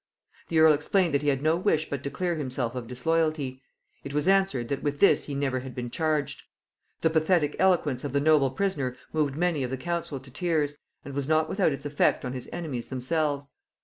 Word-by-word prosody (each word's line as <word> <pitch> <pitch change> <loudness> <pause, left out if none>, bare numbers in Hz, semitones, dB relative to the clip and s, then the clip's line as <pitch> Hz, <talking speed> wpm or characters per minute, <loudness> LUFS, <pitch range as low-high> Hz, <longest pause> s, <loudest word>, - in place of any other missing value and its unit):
The 165 - -1
earl 160 -1 +7
explained 165 +3 +1
that 140 - +2
he 145 - -3
had 140 -1 +1
no 160 +1 +3
wish 170 -4 +1
but 140 -2 -4
to 140 - -2
clear 175 +4 -1
himself 130 -5 -2
of 125 -2 -5
disloyalty; 145 0 -1 0.4
it 140 +1 -6
was 150 +2 0
answered, 190 -11 +2
that 140 -1 -2
with 145 -1 -2
this 200 - +5
he 140 - -5
never 135 -2 0
had 130 -1 -8
been 120 -1 -5
charged. 155 -2 -1 0.6
The 160 - +3
pathetic 160 -1 +2
eloquence 165 -9 +2
of 145 - -3
the 140 - +2
noble 145 -2 +4
prisoner 135 -5 -2 0.2
moved 150 -3 0
many 170 -2 0
of 125 - -2
the 130 - -3
council 165 -1 -3
to 130 0 -15
tears, 155 -2 0 0.3
and 140 - -7
was 140 -1 -2
not 155 0 +3
without 190 -1 +1
its 140 - -6
effect 145 -2 +1
on 125 - -3
his 130 -2 -7
enemies 150 -9 -4
themselves. 140 +2 -1
145 Hz, 215 wpm, -27 LUFS, 135-160 Hz, 0.6 s, earl